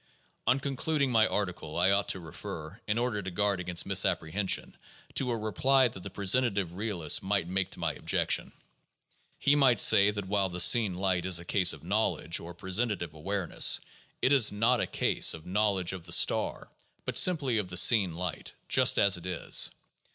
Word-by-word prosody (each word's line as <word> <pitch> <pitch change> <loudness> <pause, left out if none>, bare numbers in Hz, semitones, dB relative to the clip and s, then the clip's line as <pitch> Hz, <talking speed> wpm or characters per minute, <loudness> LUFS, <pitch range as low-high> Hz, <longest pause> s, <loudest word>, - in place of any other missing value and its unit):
On 130 +3 +2
concluding 140 0 -2
my 110 -2 +3
article, 90 -6 -4
I 90 +3 +2
ought 100 0 0
to 95 - -1
refer, 80 +3 -10
in 105 +1 -1
order 120 -3 -2
to 95 - -7
guard 100 +1 -1
against 90 -1 -3
misapprehension, 95 -1 +1 0.4
to 130 - -2
a 120 - -2
reply 125 +5 +1
that 95 - -11
the 100 - -8
presentative 100 -2 0
realist 95 -6 0
might 95 -3 -2
make 95 0 -2
to - - -11
my - - -2
objection. - - -1 0.9
He 145 - +1
might 130 -6 +2
say 100 +1 +5
that 100 -2 -5
while 100 0 -1
the 90 0 -6
seen 105 -1 +5
light 95 -1 -2
is 90 -2 +3
a 85 - -5
case 90 -1 +2
of - - -9
knowledge 90 -4 -1
or 85 +1 -11
presentative 95 -2 -3
awareness, 95 +3 +1 0.4
it 130 - +3
is 130 -6 +5
not 115 +4 0
a - - -2
case - - +1
of 80 - -14
knowledge 95 -2 -1
of 90 -3 -10
the 85 - 0
star, - - +1 0.3
but - - -5
simply 140 -10 +3
of 95 -4 -5
the 90 - -1
seen 95 -3 +5
light, 90 -1 -6
just - - +4
as 100 -2 +4
it 90 +1 -10
is. 90 -2 +1
100 Hz, 185 wpm, -28 LUFS, 90-110 Hz, 0.9 s, say